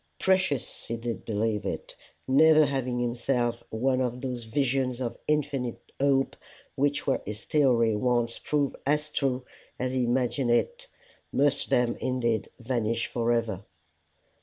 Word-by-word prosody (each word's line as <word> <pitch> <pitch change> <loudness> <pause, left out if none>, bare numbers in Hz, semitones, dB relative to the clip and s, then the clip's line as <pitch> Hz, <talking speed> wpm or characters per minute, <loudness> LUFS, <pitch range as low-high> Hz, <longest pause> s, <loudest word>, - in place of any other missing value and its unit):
Precious 185 -9 0
he 115 - -2
did 115 0 -5
believe 110 -1 0
it, 95 - -5 0.3
never 155 +3 +6
having 130 -3 -1
himself 120 0 0
one 130 +3 +1
of 125 -1 -1
those 125 -3 -4
visions 130 0 0
of 120 -2 -3
infinite 145 -5 0 0.2
hope, 135 -1 +2 0.4
which, 145 +1 0
were 135 - +1
his 105 +1 -7
theory 120 -7 +3
once 120 0 0
proved 145 -3 0
as 150 +2 0
true 130 -3 0 0.3
as 130 0 -2
he 130 -1 +1
imagined 125 +1 +1
it, 480 - +1 0.4
must 145 +1 +2
then 120 -1 +2
indeed 120 -4 -1
vanish 115 -2 -1
for 120 0 0
ever. 115 -5 0
125 Hz, 135 wpm, -28 LUFS, 115-140 Hz, 0.4 s, never